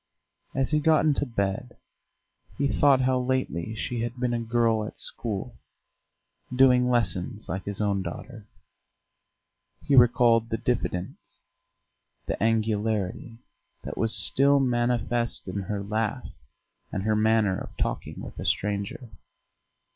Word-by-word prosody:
As 135 Hz, +1 st, 0 dB
he 150 Hz, -, +3 dB
got 155 Hz, +1 st, +3 dB
into 145 Hz, -2 st, +1 dB
bed 110 Hz, +1 st, -3 dB, 0.8 s
he 140 Hz, -, +1 dB
thought 135 Hz, -1 st, +4 dB
how 130 Hz, 0 st, +2 dB
lately 125 Hz, -7 st, -2 dB
she 120 Hz, +1 st, -3 dB
had 120 Hz, +1 st, -3 dB
been 125 Hz, -1 st, 0 dB
a 120 Hz, -, 0 dB
girl 115 Hz, -1 st, +1 dB
at 105 Hz, -, -8 dB
school, 115 Hz, +1 st, -4 dB, 0.9 s
doing 125 Hz, -1 st, +4 dB
lessons 105 Hz, -3 st, 0 dB
like 95 Hz, 0 st, -4 dB
his 100 Hz, -1 st, -3 dB
own 100 Hz, -2 st, 0 dB
daughter; 105 Hz, +5 st, -8 dB, 1.4 s
he 140 Hz, -, +2 dB
recalled 120 Hz, -2 st, +5 dB
the 115 Hz, -, -1 dB
diffidence, 95 Hz, -8 st, -4 dB, 0.8 s
the -, -, -4 dB
angularity, 110 Hz, -1 st, -1 dB, 0.5 s
that -, -, -6 dB
was 115 Hz, 0 st, +1 dB
still 140 Hz, +1 st, +4 dB
manifest 120 Hz, -3 st, 0 dB
in 95 Hz, +2 st, -3 dB
her 100 Hz, +1 st, -4 dB
laugh 110 Hz, +1 st, -2 dB, 0.6 s
and 95 Hz, -, -3 dB
her 110 Hz, +1 st, +1 dB
manner 110 Hz, -3 st, +2 dB
of -, -, -10 dB
talking -, -, -3 dB
with -, -, -9 dB
a -, -, -5 dB
stranger. 105 Hz, +4 st, -2 dB
115 Hz, 130 wpm, -26 LUFS, 105-125 Hz, 1.4 s, recalled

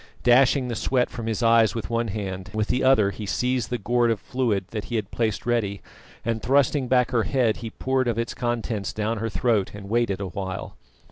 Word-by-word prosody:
Dashing 130 Hz, +2 st, +4 dB
the 120 Hz, -, -3 dB
sweat 125 Hz, +3 st, 0 dB
from 115 Hz, -2 st, -6 dB
his 115 Hz, +1 st, -1 dB
eyes 115 Hz, -1 st, +4 dB
with 115 Hz, +1 st, -4 dB
one 115 Hz, 0 st, 0 dB
hand, 95 Hz, -2 st, -5 dB
with 110 Hz, -1 st, -1 dB
the 125 Hz, -, +1 dB
other 110 Hz, -7 st, +4 dB
he 105 Hz, 0 st, -7 dB
seized 125 Hz, +2 st, 0 dB
the 125 Hz, -, -1 dB
gourd 120 Hz, +2 st, +1 dB
of 115 Hz, -3 st, 0 dB
fluid 115 Hz, -5 st, -1 dB
that 105 Hz, -2 st, -4 dB
he 120 Hz, -, -4 dB
had 105 Hz, -2 st, -2 dB
placed 110 Hz, -3 st, -1 dB
ready, 110 Hz, -5 st, -1 dB, 0.4 s
and 115 Hz, -1 st, -1 dB
thrusting 135 Hz, +1 st, +2 dB
back 125 Hz, -1 st, +3 dB
her 120 Hz, -, +2 dB
head, 110 Hz, 0 st, +1 dB
he 115 Hz, -, -6 dB
poured 130 Hz, +2 st, -1 dB
of 115 Hz, -2 st, 0 dB
its 115 Hz, 0 st, -2 dB
contents 115 Hz, -4 st, -2 dB
down 110 Hz, +1 st, -2 dB
her 115 Hz, +1 st, -2 dB
throat 105 Hz, 0 st, 0 dB
and 100 Hz, -1 st, -9 dB
waited 115 Hz, -4 st, +1 dB
a 100 Hz, -, -3 dB
while. 95 Hz, 0 st, -5 dB
115 Hz, 215 wpm, -24 LUFS, 105-125 Hz, 0.4 s, Dashing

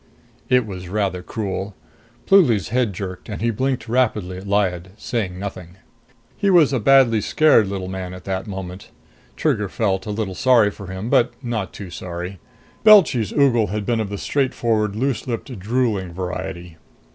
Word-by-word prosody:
It 125 Hz, -2 st, +4 dB
was 90 Hz, -3 st, -7 dB
rather 95 Hz, -2 st, -1 dB
cruel. 100 Hz, 0 st, -4 dB, 0.5 s
Pluly's 120 Hz, -, +4 dB
head 120 Hz, -1 st, +1 dB
jerked, 90 Hz, 0 st, -7 dB
and 105 Hz, -, -5 dB
he 115 Hz, +2 st, +1 dB
blinked 130 Hz, +1 st, -2 dB
rapidly 110 Hz, -7 st, 0 dB
at 95 Hz, +2 st, -9 dB
Lyad, 95 Hz, -3 st, 0 dB
saying 100 Hz, -6 st, -3 dB
nothing. 90 Hz, -3 st, -7 dB, 0.6 s
He 200 Hz, -, +1 dB
was 165 Hz, -7 st, +5 dB
a 130 Hz, -, +1 dB
badly 120 Hz, -2 st, +5 dB
scared 150 Hz, -4 st, +4 dB
little 95 Hz, -1 st, -4 dB
man 95 Hz, -1 st, -5 dB
at 90 Hz, -, -11 dB
that 95 Hz, 0 st, -3 dB
moment. 95 Hz, -1 st, -7 dB, 0.5 s
Trigger 105 Hz, -2 st, 0 dB
felt 95 Hz, -3 st, -1 dB
a -, -, -4 dB
little 105 Hz, -2 st, -3 dB
sorry 115 Hz, 0 st, +4 dB
for 100 Hz, -1 st, -10 dB
him, 95 Hz, +5 st, -5 dB
but 120 Hz, -, +3 dB
not 115 Hz, -5 st, -3 dB
too 95 Hz, -4 st, -9 dB
sorry. 90 Hz, +2 st, -6 dB, 0.4 s
Belchy's 185 Hz, -, +6 dB
ogle 125 Hz, -6 st, +3 dB
had 105 Hz, +2 st, -3 dB
been 115 Hz, 0 st, 0 dB
of 110 Hz, -3 st, -2 dB
the 100 Hz, -, -4 dB
straightforward, 115 Hz, -6 st, 0 dB
loose 130 Hz, +2 st, -1 dB
lipped, 120 Hz, -1 st, -5 dB
drooling 105 Hz, -4 st, -1 dB
variety. 90 Hz, -1 st, -5 dB
105 Hz, 165 wpm, -21 LUFS, 95-120 Hz, 0.6 s, Belchy's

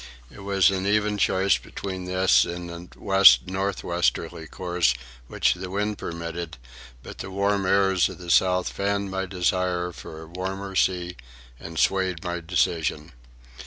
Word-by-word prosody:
It -, -, -13 dB
was 100 Hz, -2 st, +3 dB
an 95 Hz, 0 st, -2 dB
even 105 Hz, 0 st, +1 dB
choice 95 Hz, +1 st, +2 dB
between 95 Hz, -2 st, -6 dB
this 95 Hz, 0 st, +4 dB
and 85 Hz, 0 st, -7 dB
the -, -, -20 dB
west 95 Hz, -12 st, +6 dB
north 95 Hz, +1 st, -3 dB
westerly 85 Hz, -1 st, -1 dB
course 85 Hz, -7 st, 0 dB, 0.3 s
which -, -, +2 dB
the 90 Hz, +1 st, -7 dB
wind 105 Hz, +2 st, -2 dB
permitted; 85 Hz, 0 st, -5 dB, 0.5 s
but -, -, -10 dB
the -, -, -6 dB
warm 100 Hz, 0 st, 0 dB
airs 95 Hz, -2 st, +3 dB
of -, -, -9 dB
the 90 Hz, -2 st, -5 dB
south 90 Hz, 0 st, +3 dB
fanned 100 Hz, 0 st, -2 dB
my 95 Hz, 0 st, -2 dB
desire 90 Hz, -1 st, 0 dB
for 80 Hz, -1 st, -10 dB
a -, -, -12 dB
warmer 95 Hz, +3 st, -5 dB
sea 90 Hz, -1 st, 0 dB, 0.4 s
and 80 Hz, -1 st, -9 dB
swayed 95 Hz, -2 st, +1 dB
my 90 Hz, -1 st, -3 dB
decision. 80 Hz, -1 st, -1 dB
90 Hz, 155 wpm, -25 LUFS, 85-95 Hz, 0.5 s, west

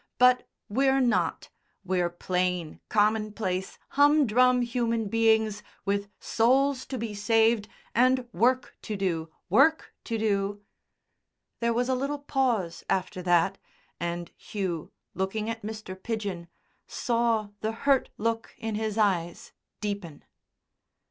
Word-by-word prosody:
But 250 Hz, 0 st, +4 dB, 0.2 s
we're 270 Hz, +5 st, +2 dB
not; 245 Hz, -2 st, +1 dB, 0.4 s
we're 180 Hz, -1 st, +1 dB
plain, 180 Hz, -1 st, -2 dB
common 215 Hz, 0 st, +2 dB
place 190 Hz, -3 st, -3 dB
humdrum 255 Hz, -4 st, +4 dB
human 230 Hz, -3 st, -1 dB
beings 220 Hz, -1 st, +2 dB, 0.2 s
with 200 Hz, 0 st, -1 dB
souls 260 Hz, +3 st, +2 dB
to 260 Hz, -, -4 dB
be 225 Hz, -2 st, -4 dB
saved 220 Hz, +1 st, +3 dB, 0.3 s
and 255 Hz, +1 st, +3 dB
work 250 Hz, +6 st, +2 dB
to 215 Hz, -3 st, -4 dB
do 170 Hz, -4 st, -1 dB, 0.2 s
work 315 Hz, -, +3 dB
to 230 Hz, -, -2 dB
do!" 205 Hz, -1 st, 0 dB, 1.0 s
There 235 Hz, 0 st, +1 dB
was 245 Hz, +2 st, +1 dB
a 260 Hz, -, +1 dB
little 275 Hz, +3 st, -1 dB
pause 250 Hz, -11 st, -1 dB
after 185 Hz, 0 st, -1 dB
that, 175 Hz, -2 st, +2 dB, 0.4 s
and 170 Hz, 0 st, -3 dB
Hugh, 185 Hz, -6 st, -4 dB, 0.2 s
looking 210 Hz, +4 st, -2 dB
at 225 Hz, 0 st, -6 dB
Mr. 215 Hz, -3 st, -6 dB
Pidgen, 195 Hz, -4 st, -4 dB, 0.4 s
saw 230 Hz, -3 st, 0 dB
the 220 Hz, -, -1 dB
hurt 270 Hz, +4 st, +2 dB
look 225 Hz, +1 st, -2 dB
in 225 Hz, -2 st, -4 dB
his 215 Hz, 0 st, -2 dB
eyes 180 Hz, -6 st, 0 dB, 0.3 s
deepen. 200 Hz, -7 st, -5 dB
220 Hz, 120 wpm, -27 LUFS, 195-240 Hz, 1.0 s, But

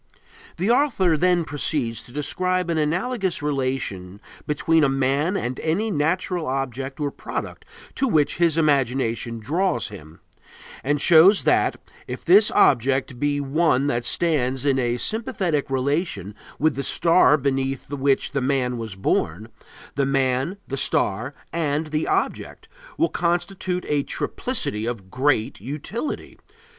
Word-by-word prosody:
The 195 Hz, +7 st, +1 dB
author 230 Hz, -, +2 dB
then 175 Hz, +1 st, +2 dB
proceeds 140 Hz, -7 st, -2 dB
to 120 Hz, -, -13 dB
describe 180 Hz, +5 st, -1 dB
an 160 Hz, -, 0 dB
analogous 185 Hz, +3 st, -1 dB
relation 130 Hz, -10 st, -3 dB, 0.3 s
between 160 Hz, +2 st, +2 dB
a 140 Hz, -, +4 dB
man 135 Hz, +7 st, 0 dB
and 125 Hz, -4 st, -3 dB
any 200 Hz, +8 st, -1 dB
natural 170 Hz, +1 st, -1 dB
object 135 Hz, +1 st, -3 dB
or 145 Hz, -1 st, -1 dB
product -, -, -6 dB, 0.3 s
to 270 Hz, -, 0 dB
which 155 Hz, -, +1 dB
his 165 Hz, -2 st, +2 dB
imagination 130 Hz, -6 st, +1 dB
draws 145 Hz, -, -1 dB
him, 80 Hz, -6 st, -12 dB, 0.6 s
and 145 Hz, +2 st, 0 dB
shows 175 Hz, +7 st, +6 dB
that, -, -, +2 dB, 0.3 s
if 125 Hz, -, -7 dB
this 200 Hz, +5 st, +6 dB
object 130 Hz, 0 st, +2 dB
be 145 Hz, 0 st, 0 dB
one 140 Hz, -1 st, +1 dB
that 120 Hz, -4 st, 0 dB
stands 135 Hz, -3 st, 0 dB
in 135 Hz, -2 st, +2 dB
a 120 Hz, -1 st, 0 dB
sympathetic 195 Hz, -, -1 dB
relation 135 Hz, -, -1 dB, 0.2 s
with 155 Hz, +1 st, +2 dB
the 140 Hz, -, -2 dB
star 165 Hz, +1 st, +4 dB
beneath 135 Hz, -1 st, -2 dB
which 140 Hz, -1 st, 0 dB
the 140 Hz, -1 st, -1 dB
man 125 Hz, -2 st, 0 dB
was 110 Hz, -4 st, -6 dB
born, 95 Hz, +2 st, -1 dB, 0.4 s
the 140 Hz, -1 st, 0 dB
man, 135 Hz, +5 st, 0 dB
the 135 Hz, -, -4 dB
star, 125 Hz, +2 st, 0 dB, 0.2 s
and 155 Hz, -1 st, -1 dB
the 155 Hz, 0 st, -1 dB
object -, -, -2 dB, 0.3 s
will 335 Hz, -, +3 dB
constitute 180 Hz, -, -2 dB
a 145 Hz, -1 st, +1 dB
triplicity 105 Hz, -4 st, -2 dB
of 100 Hz, -6 st, -6 dB
great 130 Hz, -4 st, 0 dB
utility. 150 Hz, -, -5 dB
145 Hz, 135 wpm, -23 LUFS, 130-170 Hz, 0.6 s, shows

